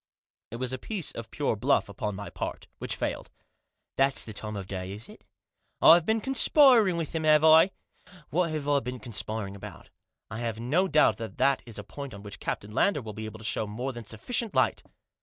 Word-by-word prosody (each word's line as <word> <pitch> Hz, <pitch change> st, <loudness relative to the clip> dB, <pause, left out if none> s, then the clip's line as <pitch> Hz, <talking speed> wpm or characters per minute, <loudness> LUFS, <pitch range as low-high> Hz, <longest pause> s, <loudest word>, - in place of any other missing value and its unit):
It -, -, -7 dB
was 130 Hz, +1 st, -3 dB
a 130 Hz, -, -4 dB
piece 200 Hz, -, -3 dB
of 115 Hz, -1 st, -8 dB
pure 145 Hz, -4 st, -1 dB
bluff 125 Hz, +7 st, +1 dB
upon 100 Hz, 0 st, -4 dB
my 100 Hz, +1 st, -7 dB
part, -, -, -5 dB
which -, -, -2 dB
failed. -, -, -4 dB, 0.7 s
"Thafs 135 Hz, 0 st, +3 dB
the 110 Hz, -, -7 dB
time 105 Hz, +1 st, -4 dB
of 100 Hz, -2 st, -5 dB
the 95 Hz, -, -7 dB
day, 95 Hz, 0 st, -5 dB
is 105 Hz, +3 st, -9 dB
it? -, -, -15 dB, 0.6 s
I've 170 Hz, 0 st, +7 dB
been 220 Hz, 0 st, +2 dB
conspiring 250 Hz, -, +5 dB
with 165 Hz, -3 st, -4 dB
him, 160 Hz, -1 st, -2 dB
have 155 Hz, 0 st, +5 dB
I? 160 Hz, +3 st, +7 dB, 0.6 s
What 170 Hz, +3 st, +1 dB
have 155 Hz, -2 st, -4 dB
I 145 Hz, -1 st, +3 dB
been 125 Hz, 0 st, -6 dB
conspiring 105 Hz, -2 st, -5 dB
about? 100 Hz, -, -11 dB, 0.2 s
" -, -, -39 dB
"I 110 Hz, -, -5 dB
have 115 Hz, -2 st, -3 dB
no 155 Hz, +11 st, +1 dB
doubt 150 Hz, -3 st, +4 dB
that 115 Hz, -2 st, -7 dB
that 140 Hz, -1 st, +2 dB
is 115 Hz, -1 st, -8 dB
a -, -, -6 dB
point 140 Hz, -5 st, -8 dB
on 100 Hz, -, -11 dB
which 105 Hz, -, -8 dB
Captain 105 Hz, -, -4 dB
Lander 185 Hz, -, +2 dB
will 110 Hz, -1 st, -7 dB
be 110 Hz, +1 st, -6 dB
able 110 Hz, 0 st, -8 dB
to 110 Hz, -, -10 dB
show 110 Hz, -, -1 dB
more 125 Hz, +6 st, -4 dB
than 120 Hz, -1 st, -8 dB
sufficient 225 Hz, -, -3 dB
light." -, -, +2 dB
125 Hz, 220 wpm, -28 LUFS, 110-160 Hz, 0.7 s, I've